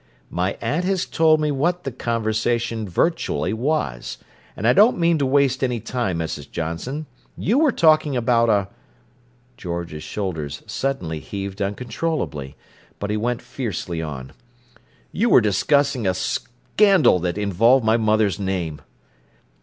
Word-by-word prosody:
"My 90 +2 -1
aunt 145 +10 -1
has 190 -1 0
told 160 -1 +3
me 150 -1 0
what 175 +6 0
the 135 - -3
conversation 115 -1 -1
virtually 135 - 0
was, 110 - -2 0.4
and 110 - 0
I 125 - +6
don't 215 - +5
mean 170 -2 +2
to 140 - +1
waste 135 -1 +2
any 125 -2 0
time, 110 -6 -2
Mrs. 80 -3 -4
Johnson. 85 - -4 0.3
You 235 +8 +1
were 310 -3 +4
talking 155 - +3
about 115 -1 +2
a—" 100 -3 +2 0.9
George's 85 -3 -5
shoulders 80 -9 -4
suddenly 110 - -3
heaved 100 +3 -6
uncontrollably; 105 - -3 0.4
but 100 +1 -3
he - - 0
went 120 +2 -2
fiercely 90 -9 -4
on: 70 -5 -6 0.8
"You 230 +5 +1
were - - +7
discussing 130 +3 +1
a 95 - +1
scandal 155 - +2
that 90 +2 -2
involved 110 +5 +3
my 110 +1 +4
mother's 110 -3 +2
name." 90 -6 -3
115 Hz, 140 wpm, -22 LUFS, 95-140 Hz, 0.9 s, were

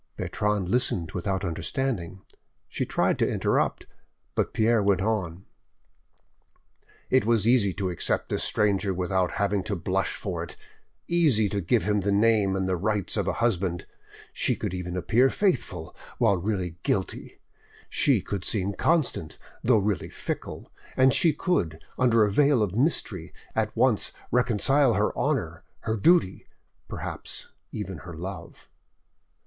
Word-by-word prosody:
Bertrande 105 -3 -1
listened 90 -7 0
without 95 +2 -2
understanding; 95 - -3 0.4
she - - -3
tried - - +1
to - - +2
interrupt, - - 0 0.5
but - - 0
Pierre 110 0 +2
went 100 -2 +2
on— 95 -5 -2 1.7
"It 130 -3 +4
was 115 -1 +2
easy 115 -5 +4
to 95 -1 -2
accept 85 - -1
this - - 0
stranger 100 -2 +1
without 90 0 0
having 100 -2 0
to 105 - -2
blush 95 +3 -1
for 90 -5 -4
it, 85 - -9 0.5
easy 150 -12 +3
to 100 -1 -2
give 85 - +1
him 105 +2 +1
the 100 +1 0
name 105 -2 +3
and 95 -1 -1
the 95 -1 0
rights 105 +1 -1
of - - -1
a - - +1
husband! 90 -6 -1 0.5
She - - +1
could - - -4
even 90 0 -4
appear 120 +9 +3
faithful 95 - -1 0.2
while 100 - +3
really 90 -3 -2
guilty; 95 -2 -2 0.5
she - - +2
could 100 -3 -4
seem 100 -2 -1
constant, 150 - 0 0.3
though 120 -1 +4
really 105 -1 -1
fickle; - - -6 0.3
and 130 0 +5
she 165 - +4
could, 135 - -1 0.2
under 115 -3 +4
a 105 - -1
veil 140 0 +4
of 95 -3 -2
mystery, 105 - -1 0.2
at 110 -1 -1
once 125 -6 +2 0.2
reconcile 125 +2 +3
her - - +1
honour, - - -1 0.2
her 110 -1 -1
duty—perhaps 115 - -2 0.2
even 95 -5 -5
her 85 +3 -9
love." 95 +3 -8
100 Hz, 145 wpm, -26 LUFS, 90-115 Hz, 1.7 s, and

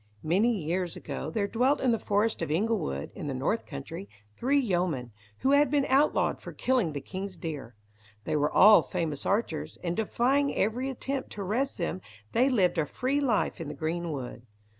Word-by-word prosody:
Many 195 +9 +3
years 180 -3 -2
ago 140 0 -5
there 200 +5 -1
dwelt 255 +7 +2
in 255 - +2
the 230 - +1
forest 210 +1 0
of 165 - -2
Inglewood, 170 - -1
in - - -6
the - - -2
North - - -1
country, 85 +8 -7 0.3
three 275 +4 +1
yeomen, 175 - 0 0.3
who 270 - +3
had 285 -1 +5
been 285 0 +2
outlawed 275 +3 +2
for - - -8
killing 245 - +1
the 145 - -4
king's 190 +5 -6
deer. 145 -8 -6 0.5
They - - -1
were 150 0 +2
all 210 +2 +8
famous 165 -6 -3
archers, 200 -6 -1
and 170 -1 -1
defying 260 +6 +1
every 245 +6 0
attempt 270 +1 -4
to 205 - -6
arrest 245 +9 -1
them, 175 +1 -2 0.3
they 255 +4 +3
lived 185 -9 +2
a 150 - +1
free 265 - -1
life 250 -9 0
in 160 - -5
the 150 - -6
green 165 +3 -2
wood. 130 -4 -6
195 Hz, 185 wpm, -28 LUFS, 160-250 Hz, 0.5 s, all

